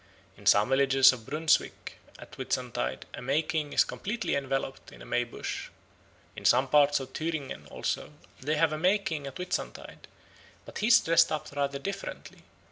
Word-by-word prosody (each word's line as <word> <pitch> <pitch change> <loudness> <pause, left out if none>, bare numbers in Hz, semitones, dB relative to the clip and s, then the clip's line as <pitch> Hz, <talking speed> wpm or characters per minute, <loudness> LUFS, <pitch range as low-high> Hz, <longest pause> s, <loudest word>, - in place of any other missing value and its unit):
In - - -10
some 105 +3 +5
villages 135 0 +5
of 115 -4 -10
Brunswick 155 +3 0 0.2
at - - -13
Whitsuntide 60 +2 -3
a - - -7
May 140 +5 +1
King 155 -2 -2
is - - +5
completely 235 +4 -3
enveloped 135 -1 -3
in - - -14
a - - -11
May 120 - 0
bush. 120 - -6 0.7
In - - -9
some 130 +2 +4
parts 145 +1 +4
of 130 -1 -8
Thüringen 160 -4 -4
also - - -3 0.3
they 150 +4 -1
have 155 0 +2
a 155 - -3
May 185 +5 +4
King 155 -8 -4
at 135 - -8
Whitsuntide, 180 0 -5 0.6
but - - -8
he 215 - +1
is 230 -1 +8
dressed 165 0 +4
up 155 -2 -3
rather 140 -1 -1
differently. 195 +7 -7
145 Hz, 175 wpm, -29 LUFS, 135-160 Hz, 0.7 s, is